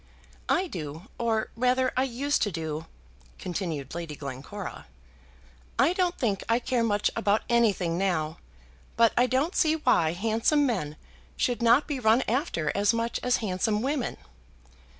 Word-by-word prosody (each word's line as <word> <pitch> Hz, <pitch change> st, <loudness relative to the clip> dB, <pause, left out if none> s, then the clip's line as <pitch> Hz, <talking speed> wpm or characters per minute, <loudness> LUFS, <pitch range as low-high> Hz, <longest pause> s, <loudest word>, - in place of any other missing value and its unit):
"I 365 Hz, -, +3 dB
do; 165 Hz, -, -7 dB
or, 225 Hz, -2 st, 0 dB
rather, 255 Hz, +2 st, +2 dB
I 260 Hz, -, +2 dB
used 275 Hz, +4 st, -1 dB
to 205 Hz, -, +1 dB
do," 160 Hz, -1 st, -4 dB, 0.5 s
continued 165 Hz, -7 st, -4 dB
Lady 165 Hz, -3 st, -5 dB
Glencora. 140 Hz, -, -7 dB, 0.9 s
"I 330 Hz, -, +4 dB
don't 365 Hz, -1 st, 0 dB
think 210 Hz, -7 st, -1 dB
I 230 Hz, -, +4 dB
care 245 Hz, -1 st, 0 dB
much 205 Hz, -2 st, +1 dB
about 205 Hz, +2 st, +1 dB
anything 200 Hz, -8 st, +2 dB
now; 165 Hz, -4 st, -1 dB, 0.6 s
but 230 Hz, -1 st, +5 dB
I 245 Hz, -, +4 dB
don't 270 Hz, +8 st, 0 dB
see 315 Hz, -1 st, +3 dB
why 250 Hz, -, +2 dB
handsome 225 Hz, -, +2 dB
men 185 Hz, -, -2 dB, 0.4 s
should 245 Hz, -1 st, 0 dB
not 235 Hz, +5 st, +5 dB
be 290 Hz, -3 st, -3 dB
run 230 Hz, +2 st, +4 dB
after 220 Hz, -, 0 dB
as 205 Hz, +3 st, +2 dB
much 230 Hz, +1 st, -1 dB
as 250 Hz, 0 st, +2 dB
handsome 210 Hz, +3 st, 0 dB
women." 270 Hz, -2 st, -1 dB
225 Hz, 150 wpm, -27 LUFS, 175-255 Hz, 0.9 s, but